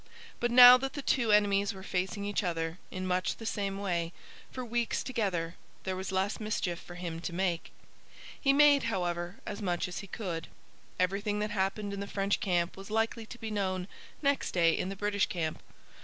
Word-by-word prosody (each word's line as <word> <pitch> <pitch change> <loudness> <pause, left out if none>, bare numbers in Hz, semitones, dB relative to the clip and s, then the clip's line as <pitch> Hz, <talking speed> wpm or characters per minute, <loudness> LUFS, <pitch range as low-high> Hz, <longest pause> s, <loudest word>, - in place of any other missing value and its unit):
But 240 - +1
now 245 +1 +11
that 270 +2 -4
the 285 - -5
two 235 -5 +2
enemies 200 -1 +3
were 190 - -9
facing 190 +2 -2
each 205 0 0
other, 165 -1 -2
in 185 0 -5
much 185 0 0
the 225 - -9
same 200 -2 -2
way, 175 -4 -2 0.4
for 255 -1 -6
weeks 235 0 -1
together, 185 -9 -1 0.3
there 190 -1 -2
was 190 +1 -4
less 190 +2 0
mischief 205 -5 -2
for 175 - -11
him 170 -2 -5
to 175 - -4
make. 175 -1 -1 0.7
He 275 - +4
made, 285 -1 +6
however, 175 -1 -2
as 205 - -5
much 180 -3 -1
as 180 - -5
he 200 - -8
could. 175 -6 -4 0.5
Everything 200 +3 0
that 210 0 -2
happened 200 +1 -1
in 200 - -4
the 200 - -4
French 200 0 0
camp 175 -3 0
was 195 +1 -9
likely 225 +1 -1
to 240 - -9
be 225 -2 -5
known 185 -3 -1 0.4
next 280 0 +1
day 170 -2 +4
in 185 - -2
the 195 - -4
British 205 0 +1
camp. 160 -3 -3
195 Hz, 195 wpm, -31 LUFS, 180-215 Hz, 0.7 s, now